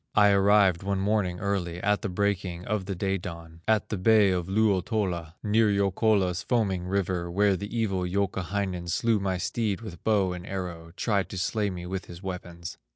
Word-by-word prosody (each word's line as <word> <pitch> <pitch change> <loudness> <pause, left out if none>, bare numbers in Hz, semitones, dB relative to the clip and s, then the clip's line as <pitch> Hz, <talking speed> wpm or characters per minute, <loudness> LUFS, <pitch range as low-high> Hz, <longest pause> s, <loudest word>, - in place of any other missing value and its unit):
I 105 -1 +6
arrived 100 -3 +4
one 100 0 -1
morning 95 -3 0
early, 90 -4 -2
At 105 +2 +1
the 105 - -2
breaking 95 -2 -1
of 105 -3 -1
the 100 - -2
day 95 +1 -1
dawn. 85 -1 -9
At 110 -1 +2
the 105 - -2
bay 105 0 +5
of 90 -1 -1
Luotola, 95 -4 0
Near 110 +1 +3
Youkola's 100 -2 +2
foaming 95 -7 0
river, 90 -2 -1
Where 100 +2 +3
the 100 +3 -5
evil 100 -5 0
Youkahainen 95 -1 -2
Slew 115 +4 +2
my 95 -1 -1
steed 105 +2 -1
with 95 -8 -9
bow 100 -4 +2
and 90 -1 -7
arrow, 90 -4 -5
Tried 100 -4 0
to 95 - -6
slay 105 +3 0
me 90 -2 -6
with 95 +1 -4
his 85 +2 -11
weapons. 90 -2 -6
95 Hz, 180 wpm, -27 LUFS, 90-105 Hz, -, I